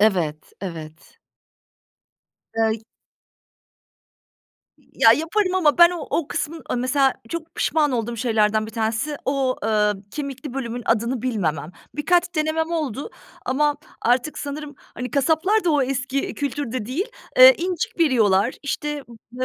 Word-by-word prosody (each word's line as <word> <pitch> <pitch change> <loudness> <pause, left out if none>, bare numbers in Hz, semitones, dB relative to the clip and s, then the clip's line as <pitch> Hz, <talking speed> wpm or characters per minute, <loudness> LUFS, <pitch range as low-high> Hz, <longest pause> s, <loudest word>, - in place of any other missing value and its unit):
Evet, 175 -8 +1
evet. 160 -4 -9 1.4
Ey 225 -1 +1 2.0
Y - - -27 0.2
ya 225 - +9
yaparım 365 - 0
ama 330 -4 +3
ben 345 0 +9
o 340 -5 -5
o 325 - -1
kısmın, 325 +2 -3
eee, - - 0
mesela 265 +2 +2
çok 330 +2 -6
pişman 300 -3 +1
olduğum 235 -1 -2
şeylerden 215 -2 +1
1 - - -8
tanesi 225 +6 -2
o, 270 -1 0
eee, 210 -1 +2 0.2
kemikli 275 -2 -6
bölümün 245 -2 -4
adını 235 +2 0
bilmemem. 170 - -1 0.2
Birkaç 350 +4 +1
denemem 315 +1 0
oldu 295 -6 -3 0.4
ama 295 +3 +1 0.3
artık 245 +5 +1
sanırım, 290 0 -6
hani, 250 -1 -8
kasaplar 325 +9 +2
da 345 - +3
o 295 -2 +3
eski 270 +1 -2
kültürde 260 -5 -3
değil. 310 - -2 0.3
Eee, - - +11
incik 355 -1 -3
veriyorlar, 230 - +3
işte 295 +1 -3 0.3
b 255 +1 -3
270 Hz, 135 wpm, -22 LUFS, 225-310 Hz, 2.0 s, Eee